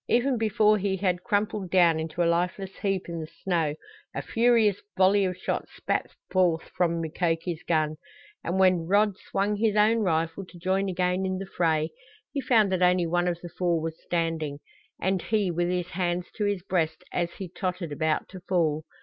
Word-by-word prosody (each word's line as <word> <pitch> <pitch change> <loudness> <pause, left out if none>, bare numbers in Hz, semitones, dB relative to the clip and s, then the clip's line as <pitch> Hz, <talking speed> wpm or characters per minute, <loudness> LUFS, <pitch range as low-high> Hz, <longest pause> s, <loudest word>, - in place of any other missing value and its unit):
Even 245 +1 +2
before 215 -1 +3
he 195 0 0
had 180 -2 0
crumpled 205 -3 -1
down 170 -3 +4
into 160 +2 -2
a - - +2
lifeless 180 +3 0
heap 195 -2 -1
in 170 -1 -4
the 155 - -5 0.2
snow 165 -5 +1 0.4
a - - -3
furious 225 -4 +3 0.2
volley 195 +1 +5
of 180 -1 -2
shots - - -3
spat - - -1 0.2
forth 175 -4 +2
from 170 -2 +1
Mukoki's 165 +1 -1
gun, 155 -2 0 0.5
and 175 - -1
when 185 -3 +3
Rod 205 +1 +3
swung 205 +1 -1
his 215 0 +1
own 215 +2 +4
rifle 165 -1 0
to 180 -1 -14
join 190 +3 0
again 180 +1 0
in 190 0 -1
the 195 - -5
fray 160 -4 0 0.4
he 280 - -2
found 220 -7 +3
that 185 -1 0
only 180 -1 +4
one 175 +1 +1
of 175 -1 -2
the 175 - -7
four 175 -1 0
was 160 0 -3
standing, 165 -4 -2 0.4
and 190 0 0
he 210 -4 0
with 175 +1 0
his 180 -1 -1
hands 175 0 -2
to 210 - -1
his 200 -3 -1
breast 180 -2 -1
as 170 -1 -1
he 190 - -6
tottered 180 -2 -4
about 155 +1 0
to 190 - -9
fall. 160 -4 +1
180 Hz, 190 wpm, -27 LUFS, 170-195 Hz, 0.5 s, volley